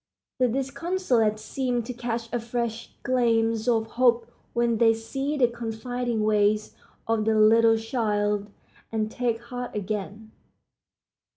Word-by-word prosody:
The 255 Hz, -, +4 dB
disconsolate 270 Hz, -, 0 dB
seem 245 Hz, +2 st, -2 dB
to 250 Hz, +3 st, -5 dB
catch 235 Hz, -1 st, -3 dB
a 240 Hz, -, +1 dB
fresh 235 Hz, -1 st, -3 dB
gleam 230 Hz, -3 st, +2 dB, 0.2 s
of 225 Hz, -2 st, +2 dB
hope 235 Hz, 0 st, +2 dB, 0.2 s
when 235 Hz, -1 st, +1 dB
they 225 Hz, -1 st, +5 dB
see 270 Hz, +6 st, -3 dB
the 250 Hz, -3 st, +5 dB
confiding 235 Hz, 0 st, -3 dB
ways 210 Hz, 0 st, +2 dB, 0.3 s
of 225 Hz, -1 st, +1 dB
the 220 Hz, 0 st, +2 dB
little 225 Hz, +1 st, +5 dB
child, 210 Hz, -3 st, -1 dB, 0.4 s
and 220 Hz, -1 st, -1 dB
take 235 Hz, -2 st, -1 dB
heart 245 Hz, 0 st, -6 dB
again. 210 Hz, +1 st, -4 dB
230 Hz, 125 wpm, -26 LUFS, 220-245 Hz, 0.4 s, they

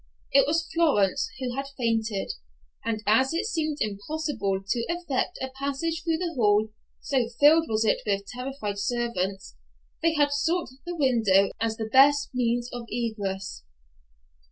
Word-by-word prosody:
It 275 Hz, -1 st, +5 dB
was 330 Hz, +2 st, +1 dB
Florence, 245 Hz, -, +2 dB
who 250 Hz, -2 st, -3 dB
had 275 Hz, 0 st, -3 dB
fainted, 225 Hz, -4 st, -1 dB, 0.5 s
and 220 Hz, -1 st, -2 dB
as 260 Hz, +8 st, +3 dB
it 365 Hz, +5 st, 0 dB
seemed 310 Hz, -7 st, -1 dB
impossible 210 Hz, -2 st, -2 dB
to 235 Hz, -, 0 dB
effect 345 Hz, -1 st, -2 dB
a 265 Hz, -, -3 dB
passage 280 Hz, +4 st, -2 dB
through 325 Hz, -1 st, +1 dB
the 345 Hz, 0 st, -3 dB
hall, 215 Hz, -4 st, +3 dB, 0.3 s
so 255 Hz, -4 st, 0 dB
filled 315 Hz, +3 st, +6 dB
was 220 Hz, 0 st, +1 dB
it -, -, +2 dB
with 200 Hz, -1 st, -1 dB
terrified 250 Hz, -5 st, -5 dB
servants, 200 Hz, -, -2 dB, 0.5 s
they 330 Hz, 0 st, +2 dB
had 290 Hz, -1 st, +3 dB
sought 325 Hz, +1 st, 0 dB, 0.2 s
the 350 Hz, -, -3 dB
window 225 Hz, -, +3 dB
as 225 Hz, -1 st, 0 dB
the 220 Hz, -, -3 dB
best 275 Hz, +5 st, +5 dB
means 240 Hz, -1 st, 0 dB
of 240 Hz, -1 st, -5 dB
egress. 205 Hz, -5 st, -3 dB
245 Hz, 150 wpm, -26 LUFS, 215-300 Hz, 0.5 s, filled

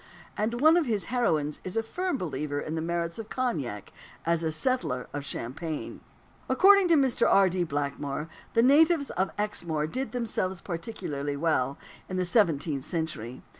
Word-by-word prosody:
And 230 Hz, +3 st, -1 dB
one 315 Hz, +3 st, +7 dB
of 330 Hz, -5 st, +1 dB
his 215 Hz, -4 st, 0 dB
heroines 155 Hz, -12 st, +1 dB
is 185 Hz, +3 st, -4 dB
a 225 Hz, -, +2 dB
firm 360 Hz, +7 st, -2 dB
believer 145 Hz, -, -3 dB
in 155 Hz, -, -4 dB
the 160 Hz, -, -2 dB
merits 170 Hz, +2 st, -2 dB
of 220 Hz, -1 st, -7 dB
cognac 140 Hz, -, -3 dB, 0.3 s
as 170 Hz, 0 st, +2 dB
a 160 Hz, -1 st, 0 dB
"settler" 155 Hz, -, -1 dB
of 145 Hz, 0 st, -3 dB
champagne. 150 Hz, +4 st, -5 dB, 0.5 s
According 395 Hz, -1 st, +6 dB
to 335 Hz, -, +5 dB
Mr. 270 Hz, -4 st, +3 dB
R. 195 Hz, -1 st, +5 dB
D. 180 Hz, 0 st, 0 dB
Blackmore, 145 Hz, -1 st, -3 dB, 0.3 s
the 230 Hz, -, +5 dB
natives 295 Hz, +3 st, +5 dB
of 190 Hz, +1 st, 0 dB
Exmoor 170 Hz, -7 st, -1 dB
did 255 Hz, +9 st, -3 dB
themselves 215 Hz, -6 st, -2 dB
particularly 150 Hz, -7 st, -4 dB
well, 140 Hz, -4 st, +1 dB, 0.3 s
in 185 Hz, -, -3 dB
the 185 Hz, -, +1 dB
seventeenth 160 Hz, -, +1 dB
century. 155 Hz, -, -4 dB
170 Hz, 165 wpm, -28 LUFS, 150-235 Hz, 0.5 s, one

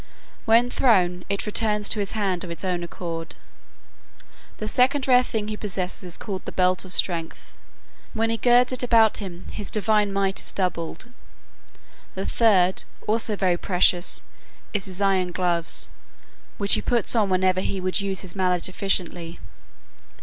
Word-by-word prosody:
When 235 Hz, +2 st, +4 dB
thrown, 180 Hz, -8 st, +2 dB
it 200 Hz, 0 st, -2 dB
returns 210 Hz, -1 st, +1 dB
to 215 Hz, -, +2 dB
his 200 Hz, -1 st, -2 dB
hand 195 Hz, -5 st, -1 dB
of 180 Hz, -, -7 dB
its 170 Hz, +3 st, -5 dB
own 180 Hz, -2 st, -1 dB
accord. 165 Hz, -1 st, -6 dB, 1.2 s
The 215 Hz, -, -5 dB
second 255 Hz, +4 st, +2 dB
rare 250 Hz, -1 st, +6 dB
thing 220 Hz, -4 st, -3 dB
he 215 Hz, -, -4 dB
possesses 190 Hz, -3 st, -4 dB
is 180 Hz, -2 st, -6 dB
called 195 Hz, -3 st, -6 dB
the -, -, -5 dB
belt 185 Hz, 0 st, +1 dB
of 185 Hz, -, -5 dB
strength. 170 Hz, -3 st, -2 dB, 0.6 s
When 225 Hz, 0 st, 0 dB
he 230 Hz, -, -1 dB
girds 245 Hz, +1 st, +4 dB
it 255 Hz, -, -1 dB
about 230 Hz, -3 st, +4 dB
him 180 Hz, -4 st, -8 dB
his 205 Hz, -, -4 dB
divine 210 Hz, -1 st, +2 dB
might 195 Hz, -1 st, +1 dB
is -, -, -4 dB
doubled. 180 Hz, +5 st, -3 dB, 1.0 s
The 190 Hz, +1 st, -4 dB
third, 190 Hz, -5 st, +3 dB, 0.2 s
also 220 Hz, 0 st, 0 dB
very 185 Hz, -3 st, +1 dB
precious, 180 Hz, -1 st, +1 dB, 0.5 s
is 205 Hz, -3 st, -1 dB
his 190 Hz, +1 st, -3 dB
iron 190 Hz, -2 st, +1 dB
gloves, 175 Hz, -2 st, 0 dB, 0.7 s
which 200 Hz, -1 st, +3 dB
he -, -, +4 dB
puts 240 Hz, 0 st, +2 dB
on 210 Hz, -4 st, +2 dB
whenever 185 Hz, 0 st, +2 dB
he 195 Hz, -, -3 dB
would 185 Hz, +1 st, -1 dB
use 195 Hz, -1 st, -3 dB
his 185 Hz, 0 st, -6 dB
mallet 180 Hz, -2 st, +1 dB
efficiently. 175 Hz, -3 st, -2 dB
195 Hz, 160 wpm, -23 LUFS, 180-215 Hz, 1.2 s, rare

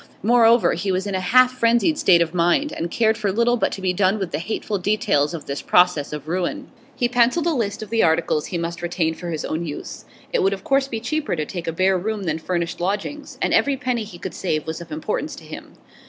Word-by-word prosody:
Moreover, 235 Hz, +1 st, +5 dB
he 200 Hz, -, -2 dB
was 185 Hz, +1 st, -1 dB
in 200 Hz, -, -3 dB
a 190 Hz, -, 0 dB
half 250 Hz, +7 st, +5 dB
frenzied 240 Hz, +5 st, +2 dB
state 175 Hz, -, +5 dB
of 165 Hz, 0 st, -7 dB
mind, 180 Hz, -, +2 dB
and 170 Hz, -, -3 dB
cared 220 Hz, +3 st, +1 dB
for 200 Hz, -, 0 dB
little 235 Hz, +4 st, +2 dB
but 240 Hz, -, 0 dB
to 195 Hz, -, -7 dB
be 185 Hz, -1 st, +1 dB
done 190 Hz, +2 st, +2 dB
with 190 Hz, -4 st, -4 dB
the 150 Hz, -, -2 dB
hateful 205 Hz, +2 st, -3 dB
details 180 Hz, -6 st, +1 dB
of 155 Hz, -, -8 dB
this 140 Hz, 0 st, -4 dB
process 180 Hz, -5 st, +3 dB
of 150 Hz, 0 st, -6 dB
ruin. 175 Hz, +1 st, -3 dB, 0.2 s
He 245 Hz, -, +1 dB
pencilled 245 Hz, +7 st, +2 dB
a 340 Hz, -, +2 dB
list 215 Hz, -5 st, -2 dB
of 215 Hz, -, -11 dB
the 230 Hz, -, +2 dB
articles 160 Hz, -2 st, +1 dB
he 180 Hz, -, -3 dB
must 170 Hz, +1 st, -4 dB
retain 170 Hz, -2 st, -1 dB
for 175 Hz, +1 st, -7 dB
his 160 Hz, -2 st, -3 dB
own 160 Hz, +2 st, -2 dB
use; 150 Hz, -3 st, -7 dB, 0.3 s
it -, -, +2 dB
would 195 Hz, +1 st, +2 dB
of 195 Hz, -1 st, -7 dB
course 275 Hz, 0 st, +2 dB
be 230 Hz, -4 st, -4 dB
cheaper 300 Hz, -, -2 dB
to 155 Hz, -2 st, -2 dB
take 170 Hz, +1 st, -6 dB
a -, -, 0 dB
bare 185 Hz, +3 st, +2 dB
room 210 Hz, +2 st, -3 dB
than 160 Hz, -3 st, -2 dB
furnished 170 Hz, 0 st, -3 dB
lodgings, 210 Hz, +11 st, -3 dB
and -, -, +1 dB
every 280 Hz, -1 st, +3 dB
penny 250 Hz, -3 st, -1 dB
he 200 Hz, -4 st, -10 dB
could 185 Hz, +1 st, -6 dB
save 155 Hz, -5 st, -2 dB
was 160 Hz, +1 st, -5 dB
of 170 Hz, -, -11 dB
importance 310 Hz, +1 st, -3 dB
to -, -, -12 dB
him. -, -, -10 dB
190 Hz, 245 wpm, -22 LUFS, 170-235 Hz, 0.3 s, Moreover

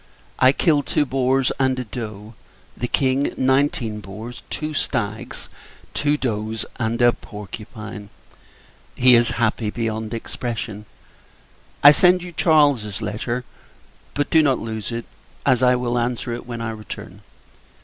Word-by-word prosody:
I 130 Hz, -, +7 dB
killed 145 Hz, -1 st, +2 dB
two 145 Hz, -, +2 dB
boars, 130 Hz, 0 st, +1 dB
and 130 Hz, -1 st, +2 dB
a 125 Hz, -, -2 dB
doe; 110 Hz, -2 st, -7 dB, 0.4 s
the 120 Hz, -, -3 dB
King, 135 Hz, +2 st, +1 dB
nineteen 130 Hz, -4 st, +1 dB
boars, 110 Hz, +4 st, -8 dB
two 155 Hz, 0 st, -3 dB
stags, 110 Hz, -7 st, -2 dB, 0.5 s
two 145 Hz, 0 st, +1 dB
does, 110 Hz, -4 st, -2 dB
and 115 Hz, 0 st, -1 dB
a 120 Hz, 0 st, +6 dB
porcupine. 105 Hz, 0 st, -9 dB, 0.9 s
He 125 Hz, 0 st, +6 dB
is 120 Hz, 0 st, +5 dB
happy 110 Hz, -1 st, +1 dB
beyond 110 Hz, 0 st, -3 dB
expression. 110 Hz, -2 st, -5 dB, 1.0 s
I 145 Hz, -, +12 dB
send 180 Hz, +4 st, +5 dB
you 180 Hz, -, -7 dB
Charles's 145 Hz, -, +2 dB
letter; 120 Hz, +4 st, -3 dB, 0.7 s
but 145 Hz, -, -1 dB
do 160 Hz, -, +6 dB
not 135 Hz, -4 st, +3 dB
lose 110 Hz, -2 st, -5 dB
it, 115 Hz, 0 st, -4 dB, 0.4 s
as 130 Hz, -3 st, +4 dB
I 125 Hz, 0 st, +5 dB
will 120 Hz, -1 st, 0 dB
answer 120 Hz, 0 st, -2 dB
it 120 Hz, +1 st, -7 dB
when 120 Hz, -1 st, -5 dB
I 115 Hz, -1 st, -2 dB
return. 110 Hz, -1 st, -9 dB
120 Hz, 140 wpm, -22 LUFS, 110-130 Hz, 1.0 s, I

